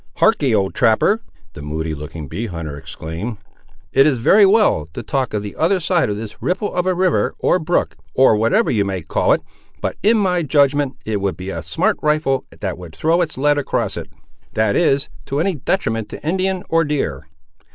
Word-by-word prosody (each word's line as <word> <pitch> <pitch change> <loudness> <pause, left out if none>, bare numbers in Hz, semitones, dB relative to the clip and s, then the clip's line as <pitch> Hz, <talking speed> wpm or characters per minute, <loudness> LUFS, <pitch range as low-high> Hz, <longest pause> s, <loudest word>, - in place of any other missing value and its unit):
"Harkee, 145 - +3
old 95 -2 0
trapper," 200 - +3 0.3
the 75 - -9
moody 80 +2 -3
looking 75 0 -7
bee 115 - -4
hunter 85 -6 -6
exclaimed; 80 +9 -6 0.6
"it 135 +2 +6
is 140 -4 +2
very 200 - +5
well 195 - +3
to - - -6
talk 135 -3 -1
of 105 -1 -2
the 100 - -7
other 185 +4 +2
side 170 - +1
of 105 - -2
this 110 -1 -8
ripple 185 +3 -1
of 180 0 0
a 185 - +2
river, 185 0 +1
or 185 - +2
brook, 175 +1 0 0.2
or 130 -4 +5
whatever 115 - +2
you 105 -4 +2
may 95 -3 -3
call - - +1
it, - - +2 0.4
but - - -3
in 220 +2 +4
my 185 -4 +1
judgment 145 -2 +2
it 105 -2 -2
would 100 -1 -1
be 95 +1 -5
a 85 - -4
smart 80 -1 0
rifle 150 -3 +1 0.2
that 95 -3 -3
would 85 -3 -10
throw 165 +3 +2
its 160 -5 -2
lead 145 +2 +2
across 140 - -1
it—that 110 -2 -4
is, 140 -4 +2 0.2
to 140 - -1
any 185 +4 +1
detriment 115 - -1
to - - -8
Indian, 185 +1 0
or 165 0 +3
deer." 80 - -2
135 Hz, 195 wpm, -19 LUFS, -, 0.6 s, it